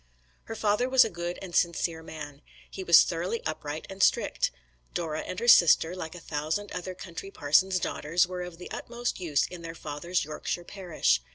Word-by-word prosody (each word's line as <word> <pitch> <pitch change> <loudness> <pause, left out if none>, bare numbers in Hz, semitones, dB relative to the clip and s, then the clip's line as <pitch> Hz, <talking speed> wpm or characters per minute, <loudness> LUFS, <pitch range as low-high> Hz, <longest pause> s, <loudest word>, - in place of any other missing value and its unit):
Her 225 - -6
father 215 +4 +1
was 260 -2 +7
a 225 - -4
good 175 0 -4
and 175 -3 -7
sincere 170 -1 +1
man. 150 -3 -9 0.3
He 190 - -6
was 170 -2 +8
thoroughly 180 +7 -3
upright 155 0 -4
and 195 0 -8
strict. - - +3 0.5
Dora 155 -3 -2
and 185 - -5
her 235 - -3
sister, 175 -4 +6
like 160 -2 -6
a - - -8
thousand 160 +6 -3
other 180 +1 -5
country 180 +1 -8
parsons' 185 +3 +3
daughters, 170 0 +1
were 180 0 -5
of 180 -1 -7
the 180 - -10
utmost 240 -2 -4
use 155 -6 +1
in 180 -1 -9
their 165 0 -7
father's 155 +4 -2
Yorkshire 155 +3 -4
parish. 175 - 0
175 Hz, 185 wpm, -28 LUFS, 160-190 Hz, 0.5 s, was